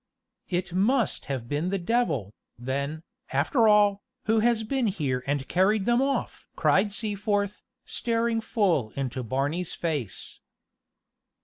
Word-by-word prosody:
"It 175 -1 -2
must 220 +4 +1
have 130 -4 -4
been 150 +7 -1
the 195 - 0
devil, 170 - 0 0.2
then, 140 +6 -3 0.3
after 230 -5 +3
all, 205 -1 +5 0.2
who 220 0 +3
has 230 0 +2
been 255 +1 0
here 140 -10 -1
and 140 -1 -1
carried 195 +3 +2
them 240 +1 +3
off!" 275 0 -2
cried 200 +2 +3
Seaforth, 205 -1 -1 0.2
staring 230 -1 0
full 190 - +1
into 130 -2 -3
Barney's 140 +9 -2
face. 150 - -3
190 Hz, 125 wpm, -27 LUFS, 140-220 Hz, 0.3 s, all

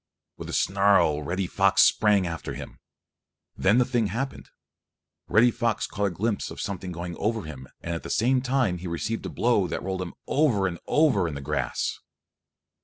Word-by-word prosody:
With - - -8
a - - -5
snarl 100 -6 +3
Reddy 90 +5 -2
Fox 95 +2 +4
sprang 105 -3 +4
after 85 -2 -5
him. - - -9 0.8
Then 105 +5 +3
the 125 - +4
thing 120 -4 0
happened. 130 +8 -4 0.8
Reddy 120 +3 +5
Fox 115 -2 -1
caught 105 - -2
a - - 0
glimpse 100 +5 -2
of - - -9
something 95 -2 -4
going 85 0 -5
over 110 0 -1
him 70 -5 -9
and 85 - -4
at 85 - -4
the - - -8
same 125 +3 +2
time 125 -8 0
he 90 - -6
received 95 +7 -3
a - - -5
blow 115 -6 +1
that 85 - -4
rolled 95 0 -3
him 90 -2 -6
over 130 -10 +2
and 90 -3 -3
over 135 - +3
in 75 - -5
the - - -4
grass. 70 - -2
100 Hz, 185 wpm, -26 LUFS, 90-115 Hz, 0.8 s, Reddy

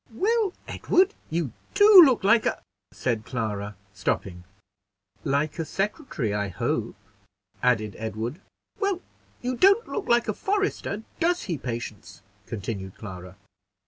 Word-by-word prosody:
"Well, 425 - +1
Edward, 380 +3 +2 0.2
you 160 -5 -1 0.2
do 410 -2 +10
look 260 -8 +3
like 220 +3 +4
a - - -2 0.2
" - - -60
said 110 +2 -2
Clara, 105 -4 -3 0.2
stopping. 90 -3 -2 0.8
"Like 150 +2 0
a - - +1
secretary, 195 - -2
I 105 0 -1
hope," 90 - -2 0.7
added 110 -5 +1
Edward. 110 - -4 0.4
"Well, 395 -3 0 0.4
you 250 +1 -1
don't 395 - +5
look 420 - -4
like 235 0 +3
a 215 - 0
forester; 390 - -1 0.2
does 350 +1 +1
he, 175 - -2
Patience?" 115 -4 -6 0.2
continued 100 -3 -5
Clara. 90 -3 -9
150 Hz, 130 wpm, -26 LUFS, -, 0.8 s, do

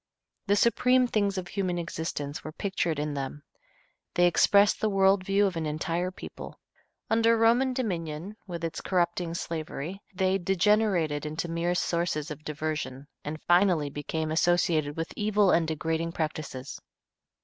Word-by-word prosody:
The 200 - +4
supreme 250 +3 +4
things 205 -4 0
of 180 -1 -4
human 185 -3 -1
existence 160 -4 -4
were 155 - -6
pictured 170 -2 -2
in 150 0 -2
them. 140 +1 -5 0.7
They 175 - +5
expressed 200 +4 +4
the 215 - +2
world 195 -1 +3
view 200 +1 +2
of 190 -3 -1
an 160 -2 -2
entire 165 +4 -1
people. 185 - -10 0.5
Under 230 +1 +4
Roman 235 +4 +4
dominion, 180 - -3
with 170 -2 -6
its 165 -1 -3
corrupting 175 -2 0
slavery, 165 +2 -5
they 190 0 +1
degenerated 185 -5 +2
into 155 +3 -3
mere 170 +1 -1
sources 170 -3 -1
of 150 0 -8
diversion, 150 -3 -4 0.2
and 155 +1 -6
finally 175 -5 +3
became 155 +2 -3
associated 160 -3 +2
with 165 0 -3
evil 210 -2 +3
and 165 -1 +3
degrading 160 +1 -2
practices. 155 -5 -4
170 Hz, 145 wpm, -28 LUFS, 155-195 Hz, 0.7 s, They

